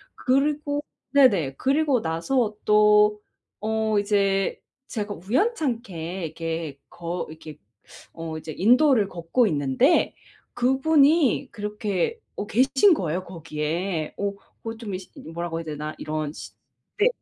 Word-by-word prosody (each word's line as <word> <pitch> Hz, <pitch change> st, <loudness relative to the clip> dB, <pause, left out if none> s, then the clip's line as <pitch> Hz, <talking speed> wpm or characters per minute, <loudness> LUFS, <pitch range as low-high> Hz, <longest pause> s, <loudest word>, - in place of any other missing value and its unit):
그리고 290 Hz, +2 st, 0 dB, 0.3 s
네네 200 Hz, -, +4 dB
그리고 275 Hz, -2 st, +2 dB
나서 210 Hz, +8 st, 0 dB
또 210 Hz, 0 st, +5 dB, 0.4 s
어 220 Hz, -1 st, +1 dB
이제 200 Hz, -1 st, +1 dB, 0.3 s
제가 210 Hz, -3 st, -4 dB
우연찮게 215 Hz, -, -2 dB
이렇게 160 Hz, -2 st, -5 dB
거 170 Hz, +1 st, -5 dB
이렇게 155 Hz, -1 st, -10 dB, 0.6 s
어 165 Hz, -1 st, -6 dB
이제 155 Hz, -1 st, -7 dB
인도를 245 Hz, -, +4 dB
걷고 175 Hz, +8 st, +1 dB
있는데 150 Hz, -, +2 dB, 0.4 s
그분이 275 Hz, +2 st, +3 dB
그렇게 210 Hz, -, -2 dB, 0.2 s
어 205 Hz, -, -4 dB
계신 270 Hz, -, +4 dB
거예요, 175 Hz, -, -2 dB
거기에. 165 Hz, 0 st, -3 dB
어 200 Hz, 0 st, -1 dB, 0.3 s
뭐 225 Hz, 0 st, -5 dB
좀 215 Hz, -4 st, -6 dB
이 185 Hz, -, -4 dB
시 185 Hz, -, -13 dB
이 -, -, -10 dB
뭐라고 170 Hz, 0 st, -3 dB
해야 -, -, -5 dB
되나 150 Hz, 0 st, -5 dB
이런 155 Hz, -1 st, -3 dB
시 95 Hz, -, -9 dB, 0.5 s
네. 425 Hz, -, +5 dB
205 Hz, 245 characters per minute, -24 LUFS, 165-255 Hz, 0.6 s, 또